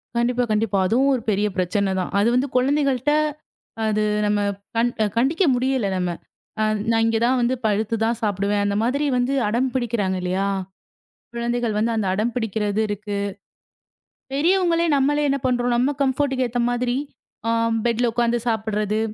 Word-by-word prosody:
கண்டிப்பா, 245 +1 +1
கண்டிப்பா. 210 -2 +1
அதுவும் 265 +6 +3
ஒரு 240 - -3
பெரிய 205 +1 +1
பிரச்சனைதான். 190 0 0
அது 210 - +3
வந்து 265 +3 +2
குழந்தைகள்ட 275 0 +1 0.7
அது 215 0 +1 0.2
நம்ம 210 0 +1 0.4
கண் 235 +1 +2 0.2
கண்டிக்க 280 +10 +2
முடியல 255 -4 0
நம்ம. 180 -1 -1 0.5
அ - - +3 0.3
நான் 225 0 +3
இங்க 225 0 +2
தான் 255 +2 +3
வந்து 245 +2 +1
படுத்துதான் 225 +2 0
சாப்பிடுவேன். 205 0 0
அந்த 200 - 0
மாதிரி 280 +5 0
வந்து 250 +3 0
அடம் 245 +5 +1
பிடிக்கிறாங்க 225 -7 -1
இல்லையா? 185 +2 -1 0.9
குழந்தைகள் 235 -2 -1
வந்து 230 +2 +1
அந்த 210 -3 0
அடம் 220 +4 -1
பிடிக்கிறது 215 -2 -1
இருக்கு. 205 0 -4 1.2
பெரியவங்களே 340 +2 +2
நம்மளே 290 +2 +2
என்ன 275 0 +1
பண்றோம்? 245 -1 +1
நம்ம 260 +4 +2
கம்ஃபோர்ட்டுக்கு 265 -1 0
ஏத்த 245 +1 -1
மாதிரி 245 +1 0 0.5
ஆ - - +2 0.4
பெட்ல 235 +1 +1
உக்காந்து 240 0 +1
சாப்பிடுறது. 215 -1 -1
235 Hz, 145 wpm, -22 LUFS, 210-255 Hz, 1.2 s, அதுவும்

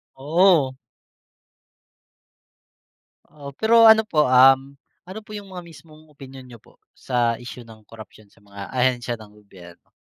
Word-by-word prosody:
Oo. 155 -1 +1 2.5
Oo, 140 -2 -12
pero 230 +1 +4
ano 220 0 +6
po, 150 -4 +1
um, 135 +2 +3 0.3
ano 185 +4 -10
po 215 - -23
yung 200 -2 -12
mga 180 -1 -9
mismong 155 0 -18
opinyon 135 -3 -14
niyo 120 - -14
po, - - -26 0.2
sa 120 -2 -2
isyu 120 0 -12
ng 110 -1 -17
korapsiyon 110 -1 -16
sa - - -27
mga 100 -1 -12
ahensiya 125 -2 -2
ng 105 -1 -16
gobyerno? 90 -4 -18
130 Hz, 135 wpm, -21 LUFS, 115-155 Hz, 2.5 s, ano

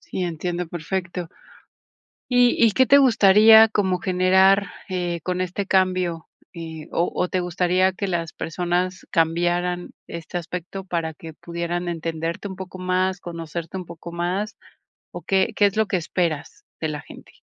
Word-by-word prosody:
Sí, 185 - -5
entiendo 175 +1 -3
perfecto. 175 +1 -4 1.0
¿Y 245 -2 +4
y 220 - +4
qué 260 +2 +4
te 280 - +7
gustaría 220 -3 +7
como 190 -4 0
generar, 190 +1 +4 0.2
eh, 175 -2 -2
con 180 0 -2
este 185 +2 -2
cambio? 185 -4 +1 0.3
Eh, 160 -2 -8
¿O 170 - 0
o 180 - 0
te 185 - -1
gustaría 180 +1 +1
que 195 +1 -4
las 165 -2 -2
personas 180 +2 -2
cambiaran 175 +2 0 0.2
este 170 +1 -5
aspecto 180 +3 -6
para 165 -3 -3
que 160 0 -11
pudieran 170 +1 -4
entenderte 165 +2 -3
un 190 - -8
poco 185 0 -8
más, 185 +1 0
conocerte 170 0 -6
un 180 -2 -6
poco 170 0 -10
más? 185 +5 -2 0.6
¿O - - -7
qué 190 -1 +1
qué 205 - +5
es 200 +1 -2
lo 220 -1 +2
que 195 - 0
esperas 165 -3 -3 0.2
de 160 - -1
la 150 -1 -4
gente? - - -14
180 Hz, 160 wpm, -23 LUFS, 170-190 Hz, 1.0 s, te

